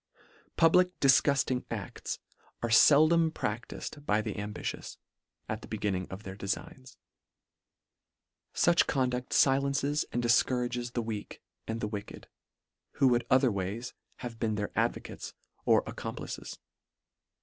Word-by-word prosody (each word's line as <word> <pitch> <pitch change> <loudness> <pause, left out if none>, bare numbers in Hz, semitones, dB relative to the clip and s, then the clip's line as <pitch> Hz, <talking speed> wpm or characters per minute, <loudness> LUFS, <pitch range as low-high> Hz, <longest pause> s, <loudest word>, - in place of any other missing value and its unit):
Public 180 +2 +4
difgufting 135 -2 +3
acls 105 -6 -5 0.5
are 120 - 0
feldom 155 +7 +6
pradtifed 120 +3 -5
by 105 -6 +2
the 110 -1 -3
ambitious, 105 0 -5 0.5
at - - -4
the - - -10
beginning 95 -3 -2
of 95 +3 -8
their 95 -2 -7
defigns. 105 +6 -5 1.5
Such 170 -1 +3
conducl 125 -3 0
filences 140 +2 +2
and 120 - -1
difcou 120 +2 +3
rages 120 0 -3
the 120 - -1
weak, 110 -2 -6 0.2
and 115 +1 -3
the - - -1
wicked, 105 -1 -7 0.7
who 135 -2 +4
would 120 -1 +1
otherways 115 -3 +1 0.3
have 115 -2 -7
been 110 -2 0
their 105 -1 -3
advocates - - -2 0.3
or - - +4
ac - - -6
complices. - - -6
120 Hz, 125 wpm, -30 LUFS, 105-140 Hz, 1.5 s, feldom